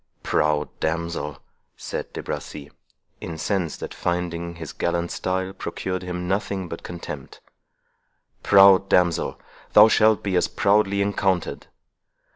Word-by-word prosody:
"Proud 75 -1 +1
damsel," 80 -3 -2 0.4
said - - -5
De - - -6
Bracy, 75 -1 -6 0.5
incensed 85 0 -3
at - - -6
finding 85 -1 -3
his 80 -3 -8
gallant 85 0 -1
style 95 +1 -2
procured 95 -1 -4
him 90 -1 -5
nothing 95 -1 -2
but 85 - -7
contempt—"proud 95 +4 0
damsel, 90 -2 +2 0.3
thou 105 +1 +9
shalt 110 -1 +4
be 100 -2 -1
as 90 - +3
proudly 100 -1 +2
encountered. 95 -3 -1
90 Hz, 110 wpm, -23 LUFS, 85-95 Hz, 0.5 s, thou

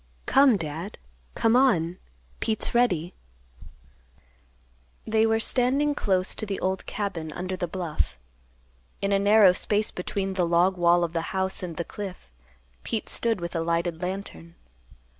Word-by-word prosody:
"Come, 270 -5 +5
Dad. 165 +4 -6 0.4
Come 225 +1 +2
on, 185 -10 +2 0.4
Pete's 220 -2 -1
ready." 185 -9 +1 1.9
They 220 0 +2
were 225 0 +2
standing 265 +5 +2
close 190 -8 +1
to 215 - -5
the 195 -1 -3
old 190 0 -2
cabin 180 -7 -4
under 185 +3 -4
the 175 -1 -3
bluff. 170 - -3 0.8
In 200 - -1
a 200 - +3
narrow 200 -1 +6
space 210 +3 0
between 195 +1 -3
the 185 -1 0
log 175 +3 +3
wall 175 0 +3
of 170 -1 -3
the 165 - 0 0.2
house 190 0 0
and 170 -3 -6
the 170 - -3
cliff, 190 - -8 0.5
Pete 220 - -3
stood 230 -4 +1
with 170 0 -6
a 165 - 0
lighted 170 0 -1
lantern. 180 - -6
190 Hz, 145 wpm, -26 LUFS, 170-215 Hz, 1.9 s, narrow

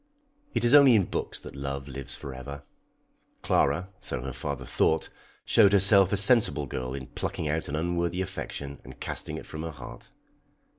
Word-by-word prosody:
"] 285 +1 -38
It - - +1
is 120 - +4
only 140 -4 +8
in 100 - +4
books - - -4
that - - -10
love 70 0 -5
lives 70 0 -6
for 70 - -8
ever. 70 +2 -8 0.8
Clara, 80 +7 +1
so 60 - -5
her 65 -1 -5
father 70 +2 -5
thought, 80 0 +1 0.4
showed 105 -3 +5
herself 100 -1 +6
a 100 - +2
sensible 100 - +4
girl 65 0 -5
in 65 -1 -6
plucking 75 - -4
out 80 +2 -1
an 70 - -2
unworthy 85 +2 -1
affection 70 -6 -6
and - - -13
casting - - -4
it - - -9
from 80 - -7
her 80 - -4
heart. 70 -6 -11
80 Hz, 185 wpm, -27 LUFS, 70-95 Hz, 0.8 s, only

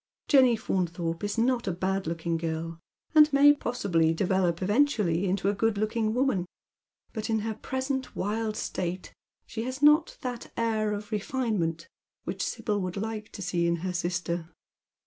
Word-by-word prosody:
Jenny 260 -5 +6
Faunthorpe 175 -4 -2
is 205 +2 -2
not 240 0 +1
a - - +2
bad 190 +1 -1
looking 165 0 -2
girl, 165 0 -3 0.3
and 305 -1 +7
may 285 +1 +7
possibly 180 - +1
develop 180 -2 +1
eventually 205 - +2
into 190 +1 0
a 200 - +3
good 220 +1 +1
looking 215 +1 0
woman, 250 -9 +1 0.7
but 220 -1 -4
in 220 -1 +1
her 220 +1 -2
present 260 +3 -3
wild 215 +2 -1
state 180 +1 -4 0.3
she 225 - -5
has 255 +4 -4
not 300 +2 +5
that 245 -2 -5
air 220 -2 +1
of 210 +1 -5
refinement 205 -7 -1 0.4
which - - -3
Sibyl 205 -2 -1
would 185 +1 -4
like 215 +1 -4
to 200 - -6
see 175 -1 0
in 170 - +2
her 185 - -1
sistoi 175 -1 -2
205 Hz, 160 wpm, -28 LUFS, 175-235 Hz, 0.7 s, and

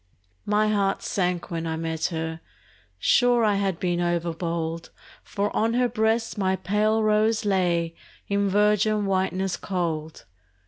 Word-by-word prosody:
My 210 +1 +2
heart 200 -2 0
sank 180 -3 -1
when 165 -1 -3
I 160 - -2
met 160 0 -3
her: 160 -1 -3 0.6
sure 245 -2 +3
I 210 -2 +3
had 195 -4 -1
been 175 -1 0
overbold, 170 -1 -2 0.3
For 205 +1 -3
on 225 +2 +1
her 250 0 +3
breast 225 -1 0
my 190 -1 +1
pale 215 +4 +1
rose 215 +1 +2
lay 175 -4 +1 0.3
In 200 0 +1
virgin 210 +1 +2
whiteness 190 -1 0
cold. 160 -5 -3
195 Hz, 135 wpm, -25 LUFS, 170-210 Hz, 0.6 s, sure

